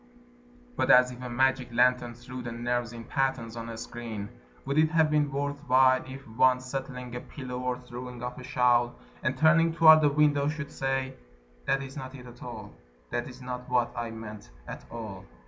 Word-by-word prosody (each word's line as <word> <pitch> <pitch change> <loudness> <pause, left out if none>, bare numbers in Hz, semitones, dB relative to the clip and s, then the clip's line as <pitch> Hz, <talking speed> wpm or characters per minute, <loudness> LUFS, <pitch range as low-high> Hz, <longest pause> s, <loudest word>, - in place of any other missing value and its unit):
But - - 0
as 125 0 +7
if 125 0 -10
a 125 - -5
magic 130 0 +1
lantern 125 0 +2
threw 125 +1 -8
the 120 -1 -5
nerves 120 0 -2
in 115 -1 -8
patterns 130 -3 -1
on 115 0 -6
a 115 - -6
screen: 115 -3 -6 0.4
Would 140 +3 +1
it 155 0 +4
have 160 -2 +3
been 150 -2 +2
worth 145 +1 -2
while 130 0 +5
If 135 0 -9
one, 125 +3 +3
settling 125 -1 -6
a - - -3
pillow 125 -1 -7
or 125 -1 -1
throwing 125 0 -8
off 125 0 -5
a - - -9
shawl, 125 -2 +2 0.3
And - - -1
turning 165 +1 +4
toward 160 -1 +8
the 150 - +5
window, 145 -1 +3
should 150 0 -4
say: 135 -1 -1 0.5
"That 135 0 +1
is 135 0 -9
not 130 -1 -7
it 125 -2 -11
at 120 0 -13
all, 110 -4 -8 0.4
That 120 - -2
is 130 0 -11
not 125 0 -6
what 120 -1 +2
I 120 -1 -3
meant, 110 -2 -9 0.2
at - - -8
all." 110 -5 -7
125 Hz, 200 wpm, -28 LUFS, 120-135 Hz, 0.5 s, toward